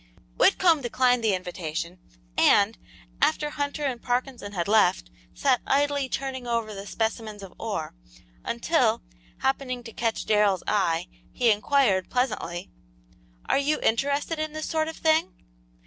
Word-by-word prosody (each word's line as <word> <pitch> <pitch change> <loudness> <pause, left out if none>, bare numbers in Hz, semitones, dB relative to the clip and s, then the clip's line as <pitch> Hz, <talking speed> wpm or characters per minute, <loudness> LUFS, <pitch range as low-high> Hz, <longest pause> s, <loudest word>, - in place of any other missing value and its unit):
Whitcomb 330 - +4
declined 245 0 +2
the 210 -3 +3
invitation, 175 -1 -5 0.4
and, 205 +2 +4 0.5
after 300 0 +2
Hunter 285 0 -3
and 250 -4 -2
Parkinson 245 -4 -2
had 175 -2 -2
left, 130 - +3 0.2
sat 260 -3 +2
idly 285 -1 +1
turning 260 -2 -4
over 230 -2 -1
the 200 0 -8
specimens 220 -2 -3
of 190 - -10
ore, - - -3 0.5
until, - - +1 0.4
happening 260 -2 -1
to 225 -1 -10
catch 230 -2 -1
Darrell's 210 -3 +2
eye, 180 -4 +1 0.2
he 240 -3 +3
inquired, 210 -3 +2
pleasantly, 215 -9 -2 0.7
"Are - - +2
you 295 +2 +1
interested 285 +7 0
in 310 -1 -3
this 310 0 -4
sort 315 -1 0
of 320 - -6
thing?" 315 - +2
240 Hz, 135 wpm, -26 LUFS, 205-280 Hz, 0.7 s, Whitcomb